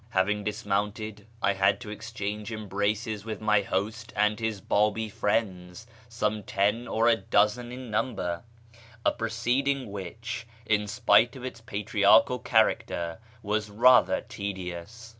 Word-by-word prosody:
Having 105 0 +1
dismounted, 105 +1 -2 0.2
I 100 - +3
had 95 0 +2
to 105 -4 -7
exchange 105 -1 -5
embraces 105 0 -2
with 110 -2 -5
my 105 -1 +3
host 110 +4 -3
and 105 +1 +2
his 110 -3 -2
Babi 105 +3 +1
friends 100 -2 -2 0.2
(some 105 -2 -1
ten 105 +4 0
or 115 +1 +2
a 115 - +6
dozen 110 +3 +1
in 125 -2 -8
number), 105 -6 -1 0.6
a - - +5
proceeding 120 +2 -1
which, 110 +4 -6 0.2
in 105 -1 +1
spite 110 +3 +4
of 130 -1 -8
its 120 -3 -7
patriarchial 110 +1 +3
character, 100 -7 +1 0.2
was 105 +1 -1
rather 110 -3 +5
tedious. 100 +3 -6
105 Hz, 130 wpm, -27 LUFS, 100-115 Hz, 0.6 s, a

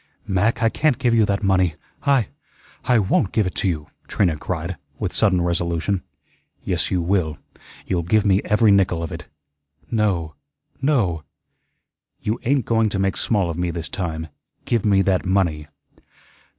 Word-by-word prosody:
"Mac, 100 +5 +1
I 115 - +5
can't 150 +2 +1
give 125 -3 +1
you 110 -2 +4
that 100 +1 -1
money. 95 -4 +2 0.3
I 135 -7 +3 0.6
I 125 - +4
WON'T 95 -2 +1
give 110 - +1
it 95 - -3
to - - -1
you," 75 -5 -2 0.2
Trina 90 -6 +1
cried, 85 +3 -4 0.2
with 90 - -3
sudden 95 -5 +2
resolution. 85 +2 -1 0.6
"Yes, - - -1
you 90 -2 0
will. 85 -4 0 0.5
You'll 90 -2 0
give 100 +5 +2
me 100 0 +4
every 105 0 +3
nickel 95 -4 +3
of 80 - -5
it." - - -8 0.6
"No, 95 -8 0 0.5
NO." 110 - +1 1.0
"You 110 +2 -2
ain't 135 -2 +2
going 115 -1 +2
to 100 - -3
make 95 0 0
small 100 -6 +1
of 85 - -6
me 90 0 0
this 85 -2 -4
time. 80 -4 -4 0.4
Give 115 -3 +1
me 100 -3 +4
that 95 -2 +1
money." 85 -6 0
95 Hz, 165 wpm, -22 LUFS, 85-105 Hz, 1.0 s, I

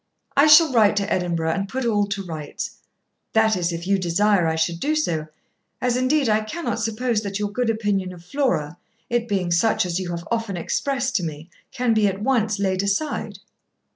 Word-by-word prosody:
I 285 +2 +6
shall 305 -1 +7
write 215 -3 +4
to 200 0 0
Edinburgh 170 -3 0
and 195 +3 -2
put 260 +2 -3
all 205 -3 +2
to 200 -1 -3
rights; 155 -4 -5 0.6
that 220 -1 +4
is, 175 -1 -1
if 170 +1 -5
you 195 +1 +2
desire 185 +1 +2
I 160 - 0
should 165 +1 -1
do 305 - 0
so; 160 - -1 0.5
as 250 -1 0
indeed 260 +2 +2
I 215 0 +3
cannot 315 +11 -4
suppose 225 0 -1
that 200 -2 -4
your 205 -1 -2
good 245 +2 -1
opinion 205 -4 -1
of 175 -1 -13
Flora, 175 - -1 0.3
it 240 -1 0
being 190 -4 -1
such 185 +4 +2
as 175 0 -2
you 185 -2 -4
have 170 0 -5
often 225 -5 -1
expressed 265 +8 -1
to 185 - -3
me, 155 +1 -6 0.2
can 250 -3 +1
be 215 -2 +3
at 195 0 -2
once 220 -3 +1
laid 190 -2 0
aside.' 200 +10 -2
205 Hz, 200 wpm, -23 LUFS, 175-235 Hz, 0.6 s, shall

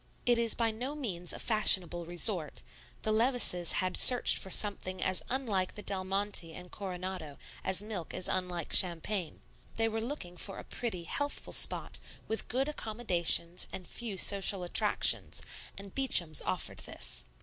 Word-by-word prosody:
It 240 -1 +3
is 230 -1 +4
by 230 -1 -1
no 250 +7 -6
means 180 - -3
a - - -6
fashionable 185 -6 +3
resort; 175 -3 +1 0.4
the 215 - -1
Levices 220 -7 +2
had 185 0 -1
searched 250 -1 +8
for 190 - -9
something 185 -1 +2
as 185 -1 -1
unlike 220 -8 -2
the 210 - -9
Del 190 -2 -3
Monte 195 -3 -2
and 180 0 -12
Coronado 185 -6 -7 0.3
as 190 +1 +1
milk 205 -6 -7
is 185 - -1
unlike 180 -3 -3
champagne. 175 0 -1 0.3
They 225 0 0
were 225 0 -4
looking 225 -8 -6
for 195 +2 -7
a - - -9
pretty, 215 -8 -6
healthful 285 +11 -4
spot, - - +3 0.3
with 220 - -4
good 265 +4 -2
accommodations 185 - 0
and 185 - -9
few 225 -5 -6
social 195 -1 +3
attractions, 175 - +2 0.3
and 195 -1 -10
Beacham's 175 - +3
offered - - -4
this. - - -4
195 Hz, 155 wpm, -30 LUFS, 175-225 Hz, 0.4 s, searched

